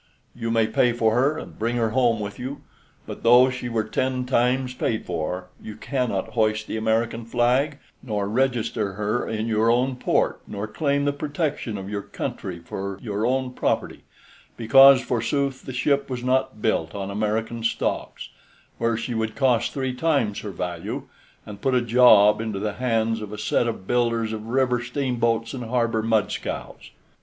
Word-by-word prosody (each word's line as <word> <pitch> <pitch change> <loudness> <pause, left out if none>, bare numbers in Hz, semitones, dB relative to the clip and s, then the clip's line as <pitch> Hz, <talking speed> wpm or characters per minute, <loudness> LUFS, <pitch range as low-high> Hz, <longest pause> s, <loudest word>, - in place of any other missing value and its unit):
You 115 -1 -4
may 115 -1 +3
pay 115 +2 +2
for 115 -2 +2
her 135 +6 +2
and - - -9
bring 115 +2 0
her 115 -2 +1
home 120 -2 +2
with 100 -1 -6
you, 130 +3 -6 0.4
but - - -8
though 125 +2 +6
she 125 -1 -5
were 115 -2 0
ten 130 +3 -1
times 125 +1 +1
paid 115 -3 -2
for, 90 +2 -4
you 105 - -8
cannot 120 -4 -2
hoist 110 -2 +1
the - - -5
American 115 +1 0
flag, 125 +5 +1 0.2
nor 105 -5 -2
register 115 -3 0
her 105 +4 -2
in 110 0 -2
your 110 0 +2
own 125 +2 +2
port, 125 - 0
nor 100 0 -4
claim 140 +5 0
the 145 - +1
protection 145 - -3
of 95 0 -7
your 100 0 -3
country 90 -2 -5
for 95 +3 -6
your 105 0 -2
own 130 0 -1
property - - -1 0.6
because, 135 +3 +7
forsooth, 130 +3 -1
the - - -4
ship 140 +2 0
was 125 -2 -4
not 130 -3 0
built 80 -6 0
on 100 0 -4
American 110 +3 -2
stocks, 115 - -2 0.5
where 115 -1 +1
she 120 +1 -4
would 110 -1 -2
cost 125 -4 +2
three 130 -2 -2
times 125 -7 0
her 105 - -6
value, 90 -3 -4 0.4
and 100 -1 -10
put 135 -1 +1
a - - +5
job 110 -3 +6
into 110 -3 -3
the 105 +1 -2
hands 115 -2 0
of 105 -1 -7
a 105 - -6
set 115 +2 +1
of 110 -5 -4
builders 115 -1 0
of 110 0 -6
river 125 0 +1
steamboats 120 -3 -1
and 125 -3 -5
harbor 115 -1 0
mudscows." 110 -2 -2
115 Hz, 175 wpm, -24 LUFS, 110-125 Hz, 0.6 s, because